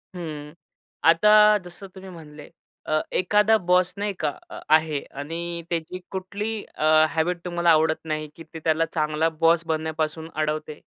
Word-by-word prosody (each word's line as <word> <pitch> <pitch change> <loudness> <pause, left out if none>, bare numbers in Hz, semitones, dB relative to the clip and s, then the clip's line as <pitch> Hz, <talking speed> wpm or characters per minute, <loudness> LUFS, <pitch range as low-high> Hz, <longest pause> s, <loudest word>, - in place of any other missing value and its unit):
हं, 150 -3 -7 0.6
आता 210 +4 +6
जसं 175 +3 -10
तुम्ही 190 0 -10
म्हणले 150 -4 -12 0.4
अ, 155 0 +1
एखादा 210 +4 +3
बॉस 180 0 +3
नाही 205 0 -2
का - - 0 0.2
अ - - -7 0.2
आहे 155 -2 0 0.2
आणि 170 +2 -4
त्याची 170 +2 -4
कुठली 200 +3 -4 0.2
अ, 155 0 +4
हॅबिट 170 +2 -1
तुम्हाला 175 -1 0
आवडत 160 0 +3
नाही 155 -1 -3
की 165 - -11
ते 160 - -7
त्याला 160 0 +2
चांगला 155 0 0
बॉस 165 +1 +2
बनण्यापासून 160 0 -3
अडवते? 155 0 -3
165 Hz, 150 wpm, -24 LUFS, 155-180 Hz, 0.6 s, आता